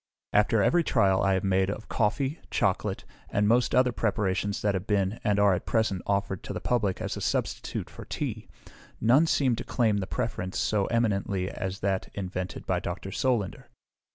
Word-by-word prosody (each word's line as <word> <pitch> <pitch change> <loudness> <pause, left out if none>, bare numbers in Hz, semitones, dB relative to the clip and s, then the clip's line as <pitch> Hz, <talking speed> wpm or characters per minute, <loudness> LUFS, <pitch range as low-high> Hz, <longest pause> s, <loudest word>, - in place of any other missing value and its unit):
After 105 0 +4
every 175 - +3
trial 100 -10 +3
I 95 -1 +3
have 95 - -1
made 95 0 +2
of 105 +2 -5
coffee, 135 +8 0
chocolate, - - 0 0.2
and 105 +1 +1
most 120 +3 +3
other 125 0 +4
preparations 100 -3 -1
that 105 -1 +2
have 95 +1 -3
been, 100 +1 +1
and 105 -3 +2
are 100 -1 +5
at 90 - -3
present, 110 -5 +1
offered 100 -2 0
to - - -6
the - - -3
public 105 -6 0
as - - -3
a - - -6
substitute - - -2
for - - -11
tea, - - -4 0.5
none 130 +9 +4
seem 130 -6 +2
to - - -4
claim 110 -4 +1
the 95 -2 -2
preference 95 -5 -3
so 105 -2 +1
eminently 100 -5 0
as 95 0 -5
that 95 -1 -1
invented 95 -1 -4
by 90 -2 0
Dr. 90 +2 -5
Solander. 120 -4 -1
100 Hz, 180 wpm, -28 LUFS, 95-115 Hz, 0.5 s, are